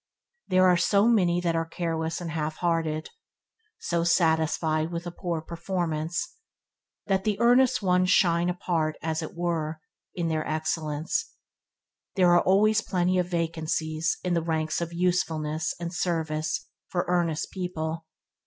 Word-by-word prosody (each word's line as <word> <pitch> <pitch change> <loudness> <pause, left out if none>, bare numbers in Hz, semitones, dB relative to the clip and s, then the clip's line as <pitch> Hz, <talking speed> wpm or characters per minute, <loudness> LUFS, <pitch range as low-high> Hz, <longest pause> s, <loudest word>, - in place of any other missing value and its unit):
They 185 - +1
are 185 -1 +6
so 200 +5 +3
many 180 -7 +3
that 170 -2 0
are 165 - +1
careless 165 -1 -3
and 170 -2 -5
half 155 -1 -2
hearted, 165 -2 -1 0.7
so 170 -1 -1
satisfied 160 -1 +2
with 170 0 -4
a 175 - -4
poor 170 -2 -3
performance, 170 - -3 0.7
that 190 -1 +1
the 210 -1 -1
earnest 245 0 +4
ones 185 0 +3
shine 175 -2 +3
apart 165 -3 -1
as 160 0 -1
it 160 - -7
were, 165 -3 -2 0.4
in 175 -2 -1
their 155 -1 0
excellence. 155 - -2 0.8
They 190 - +2
are 175 0 +6
always 215 +3 +4
plenty 185 -2 +1
of 180 - 0
"vacancies" 160 -1 -1
in 180 -1 0
the 170 - +2
ranks 160 0 -1
of 170 0 -3
usefulness 160 -3 0
and 170 0 -4
service 160 -3 -1 0.2
for 175 -1 -1
earnest 170 -3 0
people. 165 -3 -4
170 Hz, 145 wpm, -27 LUFS, 160-180 Hz, 0.8 s, are